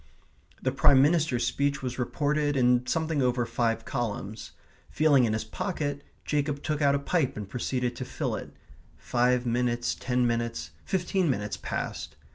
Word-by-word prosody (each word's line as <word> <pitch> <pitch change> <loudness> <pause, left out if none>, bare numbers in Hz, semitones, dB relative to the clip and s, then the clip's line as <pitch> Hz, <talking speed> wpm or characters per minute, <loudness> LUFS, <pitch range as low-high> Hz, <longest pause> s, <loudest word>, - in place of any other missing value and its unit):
The 130 - +2
Prime 135 0 +5
Minister's 145 -3 +3
speech 140 -1 0
was 125 0 -4
reported 145 +3 0
in 125 0 +3
something 160 -3 0
over 125 -1 +1
five 115 0 -1
columns. 110 -4 -4 0.4
Feeling 145 -5 +4
in 110 - 0
his 110 - -1
pocket, 145 - -3 0.2
Jacob 145 -1 -1
took 150 -1 -1
out 140 -1 +4
a - - +3
pipe 140 -3 0
and 105 -2 -5
proceeded 125 +2 -2
to 130 - -3
fill - - -3
it. - - -7 0.5
Five 125 0 +1
minutes, 120 0 0
ten 125 -1 0
minutes, 115 -9 -1
fifteen 185 -1 0
minutes 105 -5 -1
passed. - - -4
125 Hz, 155 wpm, -28 LUFS, 120-145 Hz, 0.5 s, Prime